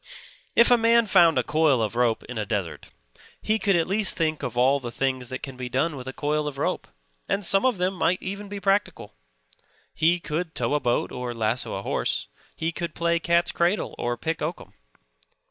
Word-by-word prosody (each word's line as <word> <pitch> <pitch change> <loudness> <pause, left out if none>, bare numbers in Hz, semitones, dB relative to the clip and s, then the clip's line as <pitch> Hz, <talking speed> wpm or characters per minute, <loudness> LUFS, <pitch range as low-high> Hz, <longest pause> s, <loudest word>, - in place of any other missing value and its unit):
If 235 +1 +6
a 245 - +6
man 230 0 +4
found 170 -7 +5
a 125 - +3
coil 155 -3 +2
of 110 0 -1
rope 120 -2 +1
in 125 -3 -6
a - - 0
desert 100 -4 -4 0.5
he 220 +1 0
could 200 -3 +2
at 165 -1 +2
least 200 +1 0
think 155 -3 0
of - - -5
all 135 +3 +4
the 120 -3 -6
things 130 0 -2
that 130 - -6
can 135 -2 -6
be 125 -1 -6
done 145 +5 0
with 130 -1 -8
a - - -3
coil 150 +2 -1
of 140 -2 -5
rope; 140 - -2 0.4
and 200 - 0
some 195 +8 +4
of 250 -6 0
them 180 +2 0
might 180 0 +1
even 200 +1 -6
be 205 0 -5
practical. 195 +2 0 0.8
He 170 +3 +2
could 165 +1 -4
tow - - -1
a 150 - +2
boat 120 -3 0
or 125 -1 -5
lasso 115 +1 -1
a 95 - -5
horse. - - -1 0.3
He 165 +1 -2
could 170 -1 -5
play 170 0 +1
cat's 170 +1 +2
cradle, 175 +4 0
or 120 0 -1
pick 160 +7 -3
oakum. 160 +3 -5
160 Hz, 210 wpm, -25 LUFS, 125-180 Hz, 0.8 s, If